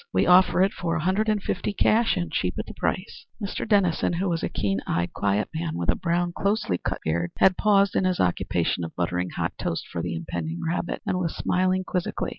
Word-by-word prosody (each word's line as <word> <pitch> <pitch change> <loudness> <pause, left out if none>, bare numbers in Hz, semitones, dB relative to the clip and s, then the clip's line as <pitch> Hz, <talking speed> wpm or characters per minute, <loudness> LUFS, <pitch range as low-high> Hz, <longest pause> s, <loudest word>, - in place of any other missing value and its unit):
We - - +2
offer 180 +1 +5
it 195 - +1
for 170 -1 -2
a 160 - -1
hundred 200 +5 +1
and 210 -2 0
fifty 190 +3 -2
cash, 225 +1 +3
and 175 -1 -2
cheap - - -1
at - - -3
the - - -9
price." - - -3
Mr. 205 0 -4
Dennison, 185 -5 +2
who 185 +3 -1
was 165 -1 -1
a - - -1
keen 95 -1 -1
eyed, 85 +1 -1
quiet 100 +1 0
man, 160 0 -3
with 85 - -3
a - - +4
brown, 175 0 0
closely 200 - 0
cut - - -3
beard, 85 +2 0
had 190 -1 +5
paused 200 -2 +3
in 190 - +2
his 185 -1 +1
occupation 85 -1 0
of 80 - -6
buttering 90 +1 -1
hot - - -3
toast 85 - -2
for 85 - -4
the 85 -1 -3
impending 80 0 -4
rabbit, 175 +1 -2
and 190 -3 0
was 170 -3 -2
smiling 185 +1 +1
quizzically. 180 -1 -2
175 Hz, 225 wpm, -25 LUFS, -, -, offer